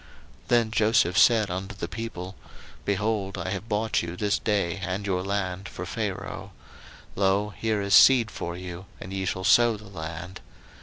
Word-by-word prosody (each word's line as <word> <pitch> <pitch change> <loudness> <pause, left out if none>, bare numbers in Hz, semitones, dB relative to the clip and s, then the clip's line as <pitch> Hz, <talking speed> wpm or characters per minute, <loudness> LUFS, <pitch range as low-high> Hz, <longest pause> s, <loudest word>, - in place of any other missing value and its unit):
01:047:023 - - -27
Then 120 -2 +3
Joseph 110 -5 +3
said 110 -5 +5
unto 95 +2 -5
the 100 - -4
people, 95 -3 -6 0.5
Behold, 100 -1 -1
I - - -3
have 100 +2 -5
bought 110 +1 +1
you 85 +1 -6
this 105 0 +1
day 100 -4 0
and 95 +1 -3
your 95 -2 0
land 95 -1 -3
for 90 - -7
Pharaoh: 100 +1 -5 0.6
lo, 100 +2 +1
here 110 -2 -1
is 100 0 0
seed 125 +1 +7
for 85 -6 -5
you, 90 +1 -8
and 95 - -8
ye 95 -1 -2
shall 95 +1 -2
sow 115 +2 +5
the 105 - -14
land. 85 0 -7
100 Hz, 170 wpm, -26 LUFS, 90-110 Hz, 0.6 s, seed